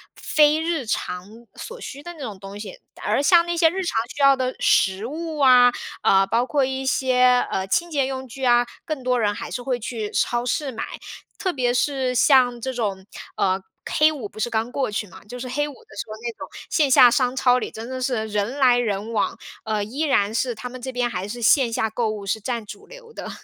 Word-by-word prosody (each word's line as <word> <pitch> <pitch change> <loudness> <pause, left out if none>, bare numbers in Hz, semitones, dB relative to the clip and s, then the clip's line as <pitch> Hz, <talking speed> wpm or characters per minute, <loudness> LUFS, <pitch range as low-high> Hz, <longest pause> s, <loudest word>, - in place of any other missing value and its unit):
非 300 0 +3
日 325 -6 -1
常 180 -4 -3 0.3
所 485 +1 -8
需 280 - -8
的 345 +3 -8
那 325 - -16
种 215 -8 -6
东 195 +1 -9
西， - - -8 0.2
而 - - +1
像 335 +3 +5
那 345 0 -2
些 330 -1 +5
日 380 +3 -3
常 335 - -2 0.2
需 285 - -4
要 275 0 +7
的 255 0 -2
食 195 +3 +2
物 315 +3 -5
啊， 250 -3 +7 0.3
呃， 195 0 +5
包 230 +4 +1
括 280 +1 +1
一 265 0 -3
些， 255 -1 +3
呃， 190 0 -2
清 340 - 0
洁 280 -3 +1
用 265 -1 -5
具 265 +2 -9
啊， 240 0 +4 0.2
更 305 -5 -4
多 250 -1 +1
人 205 -2 +1
还 - - -7
是 245 - -4
会 250 0 -1
去 220 -2 -4
超 240 0 0
市 275 +3 -1
买。 225 - -5 0.5
特 375 - -1
别 250 -6 0
是 260 -1 0
像 245 -2 +4
这 260 +1 -3
种， 200 -5 -3 0.3
呃 190 0 +1 0.3
黑 305 +1 +5
五 235 -9 -6
不 - - -13
是 240 - 0
刚 225 +1 -1
过 270 -3 -1
去 210 0 -3
嘛， 190 - -15
就 245 +4 -8
是 250 0 -6
黑 290 +3 -1
五 290 - -9
的 - - -18
时 - - -3
候 215 - -7
那 235 0 -3
种 - - -7 0.2
线 300 -4 +2
下 250 -2 +7
商 250 +1 +1
超 250 -1 +3
里 - - -4
真 225 +2 -8
的 260 0 -5
是 245 -4 -1
人 210 +5 -2
来 255 -3 +5
人 220 -2 -2
往， 220 - -1 0.3
呃， 215 -1 -1
依 235 +8 -7
然 220 -9 +2
是 240 +1 -1
他 250 +3 -7
们 255 0 -10
这 260 - -5
边 245 -1 0
还 185 -2 -4
是 240 +3 -6
线 235 0 +4
下 220 - 0
购 220 0 -1
物 210 -2 -5
是 210 +3 -1
占 235 0 -4
主 - - -11
流 - - -14
的。 - - -7
250 Hz, 250 characters per minute, -23 LUFS, 220-275 Hz, 0.5 s, 要